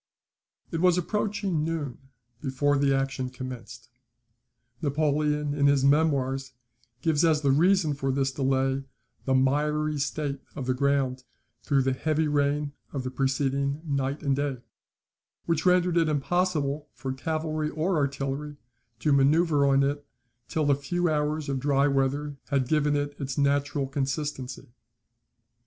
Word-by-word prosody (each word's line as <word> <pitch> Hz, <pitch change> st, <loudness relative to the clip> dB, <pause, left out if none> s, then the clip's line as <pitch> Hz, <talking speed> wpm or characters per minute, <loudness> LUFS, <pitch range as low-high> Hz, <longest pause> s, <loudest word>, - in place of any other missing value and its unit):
] -, -, -42 dB
It 165 Hz, -2 st, -2 dB
was 180 Hz, -1 st, +4 dB
approaching 195 Hz, -2 st, -1 dB
noon 155 Hz, -5 st, -3 dB, 0.4 s
before 145 Hz, +1 st, +1 dB
the 140 Hz, -1 st, +3 dB
action 135 Hz, -1 st, -1 dB
commenced. 125 Hz, -2 st, -8 dB, 0.9 s
Napoleon, 150 Hz, 0 st, +1 dB
in 140 Hz, -1 st, +3 dB
his 140 Hz, -1 st, +3 dB
Memoirs, 135 Hz, -3 st, +2 dB, 0.5 s
gives 160 Hz, -1 st, +2 dB
as 160 Hz, -3 st, +3 dB
the 140 Hz, -2 st, +3 dB
reason 170 Hz, +2 st, +3 dB
for 135 Hz, -1 st, -1 dB
this 135 Hz, 0 st, 0 dB
delay, 135 Hz, 0 st, 0 dB, 0.4 s
the 130 Hz, -, +2 dB
miry 150 Hz, +3 st, +1 dB
state 145 Hz, -1 st, -2 dB, 0.2 s
of 135 Hz, -, -4 dB
the 130 Hz, -, +1 dB
ground 130 Hz, -1 st, 0 dB, 0.4 s
through 140 Hz, -2 st, +2 dB
the 130 Hz, 0 st, +1 dB
heavy 155 Hz, +3 st, 0 dB
rain 145 Hz, 0 st, 0 dB, 0.2 s
of 135 Hz, -3 st, -3 dB
the 130 Hz, -, -4 dB
preceding 140 Hz, +1 st, 0 dB
night 140 Hz, -1 st, -2 dB
and 140 Hz, -2 st, +2 dB
day, 135 Hz, -3 st, -2 dB, 0.8 s
which 165 Hz, +1 st, 0 dB
rendered 180 Hz, -1 st, +3 dB
it 165 Hz, -2 st, +3 dB
impossible 150 Hz, -1 st, 0 dB
for 130 Hz, -1 st, -4 dB
cavalry 155 Hz, +1 st, -2 dB
or 160 Hz, +4 st, 0 dB
artillery 140 Hz, +1 st, -2 dB, 0.4 s
to 150 Hz, -, +3 dB
manoeuvre 145 Hz, +1 st, +4 dB
on 135 Hz, 0 st, +4 dB
it 145 Hz, +1 st, -1 dB, 0.4 s
till 150 Hz, -2 st, +1 dB
a -, -, +4 dB
few 175 Hz, +5 st, -1 dB
hours 150 Hz, 0 st, -1 dB
of 135 Hz, -1 st, -1 dB
dry 140 Hz, +1 st, +2 dB
weather 140 Hz, +1 st, 0 dB
had 135 Hz, -3 st, 0 dB
given 150 Hz, 0 st, +2 dB
it 145 Hz, 0 st, -2 dB
its 135 Hz, -2 st, -4 dB
natural 140 Hz, 0 st, +1 dB
consistency. 135 Hz, -2 st, -4 dB
145 Hz, 145 wpm, -27 LUFS, 135-155 Hz, 0.9 s, was